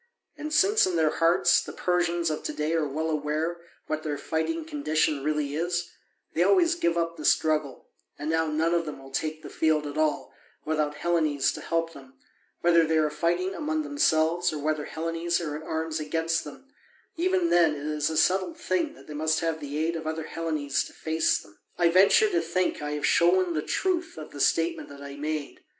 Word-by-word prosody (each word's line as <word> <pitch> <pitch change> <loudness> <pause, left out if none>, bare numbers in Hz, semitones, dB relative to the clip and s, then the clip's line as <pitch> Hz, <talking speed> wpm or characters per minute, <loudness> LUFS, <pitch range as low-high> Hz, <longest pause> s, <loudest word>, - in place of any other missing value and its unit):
And 305 +1 -6
since 390 - +4
in 180 - -1
their 160 -2 +3
hearts 165 +1 +4
the - - -8
Persians 175 -2 0
of 155 - -3
to - - -2
day 150 +2 -1
are 160 -2 +1
well 160 +3 -2
aware 155 +3 -1 0.3
what 155 0 -3
their 150 -2 -3
fighting 235 - -2
condition 155 - 0
really 150 -1 -1
is, 175 +2 -2 0.4
they - - 0
always 355 -3 +4
give 170 - 0
up 170 0 -1
the 155 - -7
struggle, 150 -3 +1 0.3
and 145 - -5
now 160 0 +1
none 160 +2 +1
of 170 -1 0
them 150 - -5
will 135 0 -13
take 155 +3 -3
the - - -8
field 155 -1 +1
at 145 +1 -4
all 155 -1 0 0.3
without 150 -1 0
Hellenes 155 -3 +1
to - - -7
help 165 0 -1
them, 135 -2 -14 0.5
whether 170 -1 +5
they 160 0 +1
are 155 -1 +2
fighting 175 +5 0
among 310 +5 -2
themselves 175 - +2
or 155 - -4
whether 150 0 -1
Hellenes 165 +1 -2
are 155 -4 -4
in 155 - -6
arms 160 0 -3
against 165 +2 -1
them: 270 - -12 0.4
even 365 0 +1
then 165 -3 +4
it 145 0 -7
is 150 0 0
a 160 - -2
settled 190 - +2
thing 320 -4 -1
that - - -16
they 150 - -9
must 155 +2 0
have 165 -1 -1
the 145 -1 -5
aid 160 +2 0
of 160 -1 -5
other 160 0 -3
Hellenes 155 -4 -2
to - - -12
face 160 0 +1
them. 100 0 -14 0.2
I 175 -1 +4
venture 195 - +5
to 355 -4 +1
think 185 -4 -1
I 150 0 -3
have 150 -1 -1
shown 175 +1 +3
the 155 - -1
truth 355 - -1
of 155 - -8
the 145 - -9
statement 165 +4 +1
that 140 0 -11
I 140 0 -8
made. 150 0 -4
160 Hz, 205 wpm, -27 LUFS, 150-175 Hz, 0.5 s, whether